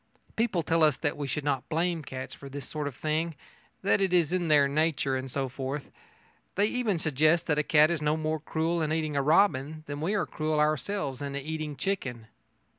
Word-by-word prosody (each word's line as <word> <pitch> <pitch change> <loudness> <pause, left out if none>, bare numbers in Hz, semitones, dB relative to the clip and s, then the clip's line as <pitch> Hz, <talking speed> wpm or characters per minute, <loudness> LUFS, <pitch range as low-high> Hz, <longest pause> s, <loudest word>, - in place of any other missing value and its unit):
People 220 -7 +1
tell 165 +1 +1
us 155 -1 +4
that 145 -3 -1
we 145 -1 -4
should 135 +3 -2
not 140 -3 -1
blame 170 +1 0
cats 130 -2 -6
for 140 - -10
this 140 0 -7
sort 150 -2 -3
of 140 - -6
thing 155 +3 -1 0.5
that 200 +1 +3
it 190 -2 +2
is 170 -4 +4
their 155 -6 +4
nature 145 -2 +1
and 130 0 -3
so 135 +1 -1
forth. 135 +2 -5 0.6
They 200 - +3
even 220 -4 0
suggest 155 +2 +2
that 150 -2 +1
a - - +2
cat 150 +2 +5
is 165 -3 -1
no 150 +1 +1
more 155 0 -1
cruel 165 +2 -1
in 155 -1 0
eating 155 -1 -1
robin 155 0 +2
than 145 -1 -5
we 190 +7 0
are 195 - +1
cruel 155 -1 -1
ourselves 150 -1 0
in 140 -1 -4
eating 155 +1 -4
chicken. 135 - -3
155 Hz, 200 wpm, -28 LUFS, 140-165 Hz, 0.6 s, cat